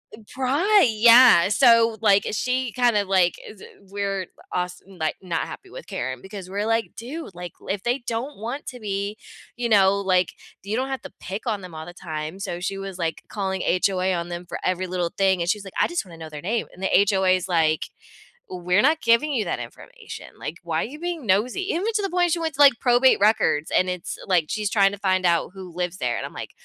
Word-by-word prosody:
eh, - - -17
pry, 295 +10 +3
yeah, 230 -3 +7
so, 230 -1 +5
like, 200 -2 +4
she 255 +2 -1
kind 245 -3 +2
of, 200 -2 0
like, 180 -3 +3
is 210 -3 -12 0.2
weird, 195 -1 -4
but - - -20
als 180 0 -3
n 195 - -15
like, 155 - -1
not 175 -3 -2
happy - - -10
with - - -10
Karen 130 0 -4
because 190 -1 -9
we're, 205 +2 -2
like, 225 0 -1
"Dude," 250 - -8
like, 175 -2 -7 0.2
"If 195 0 -2
they 240 +2 +1
don't 240 +3 -4
want 240 +7 -5
to 250 -2 -7
be, 200 0 -3 0.4
you 240 -1 -1
know, 200 -2 +4
like 185 -2 +1 0.3
you 210 +4 -2
don't 260 +1 -1
have 265 -2 -3
to 280 - -10
pick 195 +6 -6
on 215 -3 0
them 180 -3 -10
all 155 0 -7
the 175 - -9
time," 160 0 -6
so 175 -3 -4
she 195 +2 -3
was, 195 -1 -6
like, 165 -2 -3
calling 190 -2 -3
HOA 185 0 +1
on 170 0 -3
them 175 +1 -6
for - - -5
every 185 0 -1
little 175 -1 -2
thing, 190 -2 +2
and 170 - -1
she's 210 -2 -1
like, 195 - -10
"I - - +4
just 345 - -3
wanna 170 -3 -13
know 160 -1 -8
their 150 -1 -8
name," 220 +7 -2
and 185 - -14
the 190 - +3
HOA 190 -2 +3
is, 185 0 -3
like, 160 -2 +1 0.6
"We're 180 +2 +1
not 310 +3 +3
giving 235 +6 +3
you 230 -5 +1
that - - -2
information, - - -10
like, - - -6
why - - -1
are - - -4
you 300 +4 -10
being 345 -5 -4
nosy?" 225 - +1
Even 370 +6 -1
to 415 - +2
the 390 - -2
point 355 -1 +2
she - - +1
went 325 -2 -2
to, 290 - +1
like, 280 -2 +8
probate 250 +1 +4
records 200 -7 +2
and 185 - +2
it's 180 -1 -5
like, 175 -5 +3
she's 210 -2 -1
trying 195 -2 +4
to 205 - -7
find 185 -2 +1
out 170 0 +2
who 185 -2 -9
lives 180 0 -3
there, 120 -5 -1
and - - -4
I'm, - - -14
like, - - -7
200 Hz, 235 wpm, -23 LUFS, 180-240 Hz, 0.6 s, like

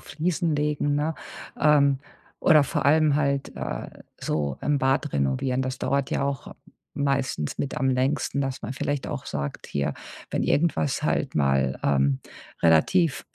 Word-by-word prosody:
Fliesen 165 -1 -1
legen, 145 -1 0
ne, 150 +2 0 0.5
ähm 140 -2 +4 0.4
oder 155 -2 +5
vor - - -2
allem 150 0 +4
halt, 140 -2 -1
äh, - - -4 0.3
so 70 -3 -2
im 145 -1 +1
Bad 135 +2 +1
renovieren. 70 - 0
Das 130 0 -3
dauert 140 0 0
ja - - 0
auch 140 -2 -3 0.4
meistens 135 - -1
mit 140 +2 -3
am 135 - +1
längsten, 135 +2 0
dass 135 -1 -3
man 120 - -4
vielleicht 145 0 -2
auch 135 - -5
sagt: 70 -1 -4
„Hier, 70 0 -2 0.4
wenn - - -1
irgendwas 145 -3 +1
halt 145 -2 0
mal, 70 -2 +1
ähm, 70 -1 +2 0.4
relativ 130 - +3
140 Hz, 150 wpm, -25 LUFS, -, 0.5 s, oder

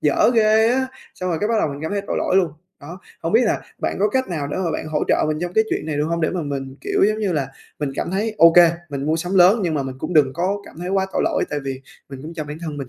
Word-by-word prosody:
dở 150 +9 +3
ghê 220 0 +4
á!" 260 +2 +1 0.3
Xong 185 - -4
rồi 165 - -1
cái 210 - 0
bắt 230 - +1
đầu 160 - +1
mình 140 0 -6
cảm 160 - -3
thấy 200 - 0
tội - - -2
lỗi 185 - +1
luôn. 180 -4 +3 0.3
Đó, 170 +6 -10 0.2
hông 165 - -2
biết 225 - +6
là 215 - 0 0.2
bạn - - -2
có 210 - +3
cách 260 +3 -1
nào 155 -5 -3
để - - -3
mà 180 -3 -1
bạn 155 - -4
hỗ 155 -1 -1
trợ - - +3
mình 155 - -1
trong 175 0 -3
cái 220 +3 +3
chuyện - - -2
này 155 -2 -2
được 145 - +1
hông? 170 +2 -1
Để 160 - +1
mà 180 -3 -3
mình, 135 -2 -5
kiểu - - +1
giống 215 0 -1
như 205 -4 0
là, 140 -4 -1 0.3
mình 145 -2 -2
cảm - - -3
thấy, 210 +4 -1
ô 165 - +8
kê, 170 -1 +7 0.2
mình 140 -1 -4
mua 155 - +1
sắm 175 +4 -3
lớn 190 +5 +6
nhưng 170 -4 0
mà 145 - 0
mình 130 -1 -6
cũng 180 - -4
đừng 145 -4 +4
có 185 +7 -1
cảm - - -14
thấy 180 - -5
quá 190 0 +1
tội - - 0
lỗi, - - +1
tại 145 - -1
vì 135 -1 -4 0.3
mình 135 -2 -9
cũng 160 +3 -8
cho 155 - -4
bản 150 +1 -7
thân 155 -3 -5
mình 140 -3 -6
170 Hz, 320 wpm, -21 LUFS, 150-195 Hz, 0.3 s, ô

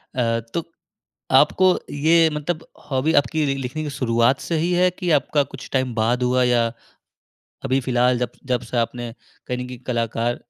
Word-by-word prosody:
अ, 115 -2 +1
तो 170 - -1 0.7
आपको 185 -1 +5
ये 160 +2 +4
मतलब 155 +2 -4 0.2
हॉबी 140 +4 +1
आपकी 155 +1 -2
लि 135 - 0
लिखने 135 +3 -4
की 150 - -4
शुरुआत 120 -1 +1
से 165 - -2
ही 170 +3 0
है, 180 +1 +3
कि 180 -1 -4
आपका 145 0 +2
कुछ 135 - -9
टाइम 130 -3 0
बाद 120 +3 +1
हुआ 125 +1 +2
या 120 -1 +3 1.0
अभी 135 0 +2
फिलहाल 125 0 +2
जब 125 - -2 0.2
जब 125 -2 0
से 125 - -4
आपने 120 0 -2 0.4
कहीं 125 - -2
न 125 0 -5
कहीं 125 -1 -9
कलाकार 115 0 -1
130 Hz, 175 wpm, -22 LUFS, 120-155 Hz, 1.0 s, आपको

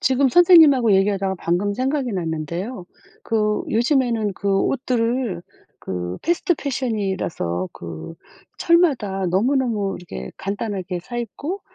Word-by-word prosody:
지금 265 +1 +3
선생님하고 305 - +6
얘기하다가 195 0 +2
방금 180 +5 0
생각이 260 +1 -1
났는데요. 175 - -4 0.4
그 210 -2 0
요즘에는 235 -3 +1
그 200 +1 -4
옷들을 240 -6 -1 0.4
그 90 -1 -4
패스트 345 +1 +1
패션 260 -6 -2
이라서 95 - -2
그 85 - -8 0.4
철마다 260 - +2
너무너무 210 0 0
이렇게 65 - -8
간단하게 195 -3 -4
사 240 +7 -8
입고 290 - -5
210 Hz, 290 characters per minute, -21 LUFS, 185-260 Hz, 0.4 s, 선생님하고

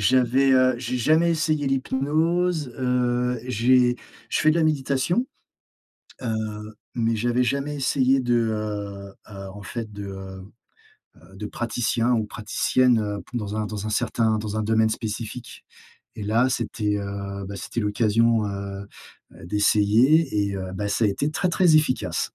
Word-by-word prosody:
J'avais, 130 +4 +3
heu, 130 -1 +4
j'ai 125 0 -3
jamais 160 +7 +3
essayé 155 -2 0
l'hypnose, 150 +4 0
heu, 125 -1 0
j'ai 125 +1 +3 0.3
je - - 0
fais 155 - +4
de 155 - +1
la 165 - +3
méditation, 150 - 0 1.0
heu, 110 -2 -4 0.2
mais 115 -1 +1
j'avais 120 +3 +1
jamais 140 +4 -1
essayé 135 -1 +2
de, 120 -2 +1
heu, 105 -3 -3 0.2
heu, 100 -1 -8
en 105 - -10
fait 115 0 -6
de, 100 -1 -7
heu, 95 -1 -8 0.7
heu, 95 - -19
de 105 - -5
praticien 120 +1 -1
ou 110 -2 +1
praticienne, 120 +3 +1
heu, 105 -1 -3
pou 125 - -7
heu, 105 +1 -3
dans 105 0 -5
un - - -2
certain 110 -1 +1
dans 105 0 -4
un 110 - 0
domaine 110 +1 +2
spécifique 115 +2 -6 0.5
et 110 - -6
là, 115 +5 +2
c'était, 105 -4 -1
heu, 100 0 -5
bah 100 +1 -7
c'était 115 +5 -4
l'occasion, 110 +1 +2
heu, 100 0 -5 0.5
heu, - - -12
d'essayer 105 - +3
et - - -4
heu, 95 -1 -5
bah, 105 +1 -3
ça 105 +3 +1
a - - +4
été 140 +10 -1
très, 180 +4 0
très 175 -2 +4
efficace. 150 -4 0
115 Hz, 160 wpm, -24 LUFS, 105-130 Hz, 1.0 s, heu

